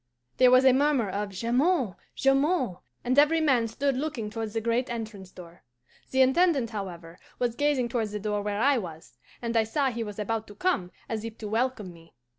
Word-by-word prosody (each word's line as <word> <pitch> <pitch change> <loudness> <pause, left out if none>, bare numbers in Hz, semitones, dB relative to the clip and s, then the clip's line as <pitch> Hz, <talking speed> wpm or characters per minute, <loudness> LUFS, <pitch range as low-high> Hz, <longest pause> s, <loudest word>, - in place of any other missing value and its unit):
"There 255 -1 +6
was 255 +1 +6
a 260 - +7
murmur 270 -6 +2
of 205 +1 -3
'Jamond! 240 - +1 0.2
Jamond!' 270 - +2 0.3
and 255 +3 +3
every 310 +3 +4
man 260 -7 +2
stood 270 +4 -1
looking 255 -6 -3
towards 220 -1 -4
the - - +2
great 235 +3 0
entrance 215 -5 -6
door. 175 -2 -14 0.5
The 265 0 +4
Intendant, 270 -3 +2
however, 175 -5 -7 0.2
was 245 -2 0
gazing 275 -2 +1
towards 225 -3 -2
the 210 - -4
door 210 0 -2
where 205 0 -2
I 270 +2 +3
was, 160 - -10 0.2
and 235 0 -2
I 225 - +4
saw 265 +5 0
he 235 -1 -3
was 210 -2 -7
about 220 +1 -2
to 205 - -12
come, 280 - 0 0.2
as 220 -1 -4
if 225 -1 -7
to 215 - -6
welcome 220 -4 -1
me. 165 -4 -19
230 Hz, 200 wpm, -27 LUFS, 210-265 Hz, 0.5 s, a